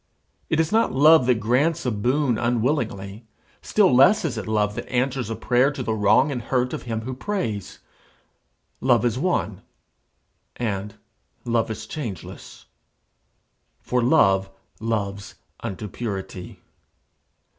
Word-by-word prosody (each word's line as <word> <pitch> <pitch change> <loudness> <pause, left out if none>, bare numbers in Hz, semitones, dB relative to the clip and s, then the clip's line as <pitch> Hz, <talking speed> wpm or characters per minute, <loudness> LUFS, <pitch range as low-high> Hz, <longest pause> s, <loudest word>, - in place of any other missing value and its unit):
It 160 - +1
is 160 0 +1
not 225 +1 +2
love 145 0 +5
that 125 - +4
grants 130 +10 +1
a 125 - +1
boon 125 +3 0
unwillingly; 115 -4 -1 0.3
still 200 -9 +3
less 180 - +5
is 140 -7 -2
it 110 - -5
love 105 -1 +1
that 120 - -7
answers 125 -1 -1
a 115 - -3
prayer 125 +4 +2
to 135 -3 -5
the 110 - -1
wrong 110 +7 +3
and 125 -3 -3
hurt 125 +1 -1
of - - -4
him 110 -1 -2
who 130 +3 -5
prays. 125 - -4 1.0
Love 125 -2 +3
is 120 +1 0
one, 140 - -1 0.9
and 105 -3 -3 0.5
love 115 -1 0
is 110 0 -5
changeless. 115 - -8 1.1
For 125 0 -1
love 95 -8 +3 0.3
loves 100 -3 -3 0.2
unto 100 +2 -5
purity. 95 -4 -6
120 Hz, 135 wpm, -23 LUFS, 105-135 Hz, 1.1 s, love